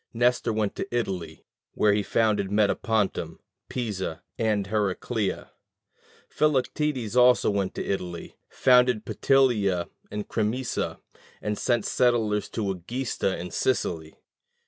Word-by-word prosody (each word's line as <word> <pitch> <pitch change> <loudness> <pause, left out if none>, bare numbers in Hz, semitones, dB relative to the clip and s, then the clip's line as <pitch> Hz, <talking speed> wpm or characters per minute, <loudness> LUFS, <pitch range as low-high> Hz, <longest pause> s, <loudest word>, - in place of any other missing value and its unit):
Nestor 120 0 +2
went 110 -2 -1
to 195 - -3
Italy, 90 - -3 0.3
where 105 -1 +4
he 105 - +2
founded 105 -1 +1
Metapontum, 105 -4 0 0.3
Pisa, 100 -9 -3
and 105 -3 0
Heracleia: 105 +1 -2 0.8
Philoctetes 140 -4 0
also 125 -3 +5
went 100 -2 -1
to - - -3
Italy, 90 -3 -4
founded 125 -3 +4
Petilia 110 -10 +2 0.2
and 105 0 -5
Crimisa, 115 +3 -2 0.4
and 105 0 -2
sent 120 -1 0
settlers 115 -4 +1
to 105 -4 -2
Egesta 100 +2 -2
in 90 0 -6
Sicily. 80 -11 -1
105 Hz, 110 wpm, -26 LUFS, 95-125 Hz, 0.8 s, also